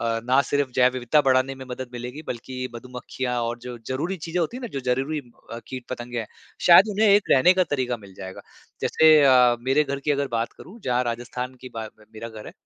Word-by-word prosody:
अ, 115 0 -1
ना 130 +2 +4
सिर्फ 145 -2 -1
जैव 125 0 +4
विविधता 130 +4 +2
बढ़ाने 130 0 +2
में 130 0 -10
मदद 125 0 -5
मिलेगी, 125 +5 -7
बल्कि 130 +1 -5
मधुमक्खियाँ 125 0 -5
और 120 +1 -3
जो 125 -1 -7
ज़रूरी 160 +9 -2
चीज़ें 165 +2 -4
होती 170 +9 -2
हैं - - -7
ना 240 - -4
जो - - -4
ज़रूरी 140 +4 -2 0.3
अ, 115 - -5
कीट 130 -2 -6
पतंगे 120 -1 -5
हैं, 110 - -6 0.4
शायद 185 +4 +8
उन्हें 210 +1 +2
एक 200 0 +4
रहने 140 +7 +6
का 185 - +3
तरीका 125 -4 -1
मिल 100 -3 -15
जाएगा 95 0 -8 0.4
जैसे 160 0 +4
अ, 125 -3 +6
मेरे 135 +4 +2
घर 140 0 -4
की 150 - +1
अगर 140 -1 0
बात 115 +1 -2
करूँ 220 +6 -13
जहाँ 125 -1 +1
राजस्थान 125 +2 -4
की 130 - -9
बा 110 -1 -4
में 110 - -19
मेरा 115 +1 -7
घर 110 -2 -10
है - - -9
130 Hz, 230 wpm, -24 LUFS, 120-145 Hz, 0.4 s, शायद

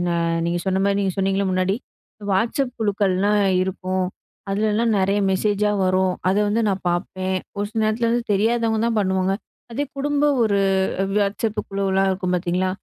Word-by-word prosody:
ஆ - - 0 0.3
நீங்க 175 +1 0
சொன்ன 190 0 +1
மாரி 200 0 +2
நீங்க 195 -2 0
சொன்னீங்களே 195 +1 +1
முன்னாடி 185 +1 +1 0.6
வாட்ஸ்சப் 235 +6 0
குழுக்கள்லாம் 205 -1 +1 0.2
இருக்கும். 185 0 -2 0.4
அதுலலாம் 215 +3 +1
நெறய 195 +2 +2
மெசேஜா 205 +2 +1
வரும் 185 0 +2
அத 190 - +3
வந்து 220 +3 +1
நான் 195 -1 -1
பார்ப்பேன், 185 +1 -2 0.2
ஒரு 205 - 0
சில 220 0 -2
நேரத்துல 225 +2 +1
வந்து 240 0 +1
தெரியாதவங்க 225 +2 +1
தான் 230 -2 0
பண்ணுவாங்க. 190 -1 +1 0.4
அதே 280 +5 -1
குடும்ப 290 +1 0 0.2
ஒரு 205 -2 +2 0.6
வாட்ஸ்சப் 210 +2 0
குழுவலாம் 195 -1 +1
இருக்கும் 185 -1 -2
பாத்தீங்களா. 180 +1 0
200 Hz, 150 wpm, -22 LUFS, 190-220 Hz, 0.6 s, அத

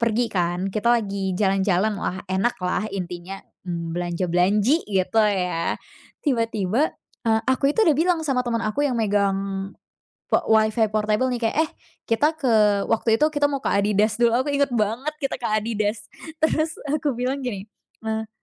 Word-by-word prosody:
pergi 230 +1 +1
kan. 180 +1 0
Kita 215 +3 0
lagi 195 -4 -2
jalan-jalan, 195 +1 +2
wah 185 - -2
enak 190 +5 0
lah 180 +4 -1
intinya. 180 0 -5 0.3
Belanja 175 +1 -3
belanji 205 - +3
gitu 190 +2 +1
ya, 180 -5 0 0.5
tiba-tiba, 230 0 +1 0.4
eee, 220 0 +3
aku 260 +2 +2
itu - - +2
sudah 315 -7 +4
bilang 350 +1 +3
sama 260 -3 +1
teman 230 -1 -1
aku 250 +8 0
yang 255 -4 -1
megang 195 -2 0 0.6
po - - +5
Wi-Fi 220 0 +3
portable 215 +3 +1
nih, 245 - -2
kayak, 225 - 0
"Eh, - - -17 0.4
kita 290 +7 +2
ke" 210 -7 +3
waktu 225 0 +2
itu 305 - +5
kita 290 0 +3
mau 275 - -1
ke - - -5
Adidas 205 +1 +2
dulu. 235 -1 +5
Aku 260 - -2
ingat 280 -1 +2
banget 230 +6 0
kita 275 - -1
ke 240 - -2
Adidas. 210 -1 -2 0.3
Terus 315 0 +1
aku 290 0 0
bilang 260 +3 -1
gini, 205 -4 -4 0.4
eee 220 0 -2
215 Hz, 165 wpm, -23 LUFS, 195-250 Hz, 0.6 s, po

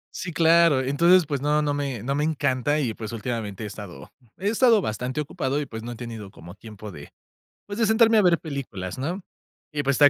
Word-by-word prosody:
Sí, 180 - -4
claro. 165 -4 +5
Entonces, 170 +7 +4
pues 140 -2 -3
no, 150 +2 +2
no 145 -1 0
me 140 -6 -3
no 135 +4 -1
me 145 - 0
encanta 145 -2 +1
y, 130 -7 0
pues, 110 +1 -7
últimamente 110 -3 -4
he - - -3
estado 105 -3 -9 0.2
he 195 - -2
estado 230 -2 +4
bastante 125 +5 -2
ocupado 140 -1 -2
y, 150 - -1
pues 110 -4 -8
no 120 +1 -6
he - - -7
tenido 115 -4 -7
como 85 -1 -12
tiempo 105 -1 -10
de, 75 -3 -11 0.6
pues, 205 +2 -6
de 225 - +3
sentarme 220 0 +5
a - - +6
ver 175 -3 +4
películas, 125 - -6
¿no? 170 +9 -3 0.5
Y 150 -2 -1
pues, 140 -1 +1
esta 145 - +8
140 Hz, 220 wpm, -25 LUFS, 115-165 Hz, 0.6 s, esta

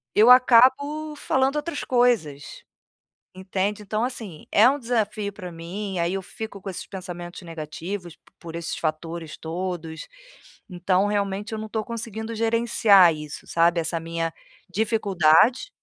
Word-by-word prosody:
eu 220 +3 +6
acabo 260 +5 +5
falando 270 -1 0
outras 300 0 -3
coisas, 235 - 0 0.7
entende. 190 +2 -2
Então 215 +2 -2
assim, 220 -10 -5
é 220 +4 +6
um 285 +2 -1
desafio 215 -4 -1
para 185 -3 -8
mim, 180 +3 -5
aí 170 +2 0
eu 195 - -2
fico 200 +1 -8
com 195 - -6
esses 185 - -6
pensamentos 175 -2 -7
negativos 170 +2 -7
p - - -48 0.2
por 165 -1 -9
esses 170 0 -4
fatores 160 0 -4
todos, 165 -1 -5 0.6
então 185 +2 +1
realmente 205 +1 -2
eu - - -3
não 220 - -5
estou 215 0 -3
conseguindo 225 -1 -5
gerenciar 225 -5 +4
isso, 150 -1 -8
sabe, 170 +1 +2
essa 165 0 -1
minha 165 0 -3 0.4
dificuldade. 205 - +3
195 Hz, 140 wpm, -24 LUFS, 170-225 Hz, 0.7 s, eu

